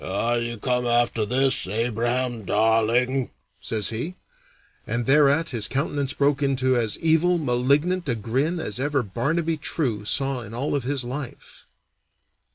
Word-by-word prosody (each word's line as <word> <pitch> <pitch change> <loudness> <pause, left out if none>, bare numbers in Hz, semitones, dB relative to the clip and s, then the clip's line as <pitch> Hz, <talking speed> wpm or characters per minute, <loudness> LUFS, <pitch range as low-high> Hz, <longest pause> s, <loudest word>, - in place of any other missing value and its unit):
"Are 115 +5 0
you 120 0 -4
come 125 +2 0
after 120 -2 +1
this, 130 -3 +2
Abraham 120 +2 -1
Dawling?" 115 +5 +2 0.3
says 110 -3 0
he, 125 +11 -4 0.7
and 120 0 -2
thereat 145 +3 +4
his 110 -4 -1
countenance 140 +1 -2
broke 145 0 +1
into 130 -2 +1
as 115 -3 0
evil, 165 +2 +2
malignant 145 +5 +1
a 120 - +1
grin 135 - -1
as 105 -8 -2
ever 140 -1 0
Barnaby 155 - -1
True 130 -8 -2
saw 135 +4 0
in 115 0 -9
all 135 +5 -2
of 140 - 0
his 135 -1 0
life. 130 +2 -8
125 Hz, 145 wpm, -24 LUFS, 115-145 Hz, 0.7 s, thereat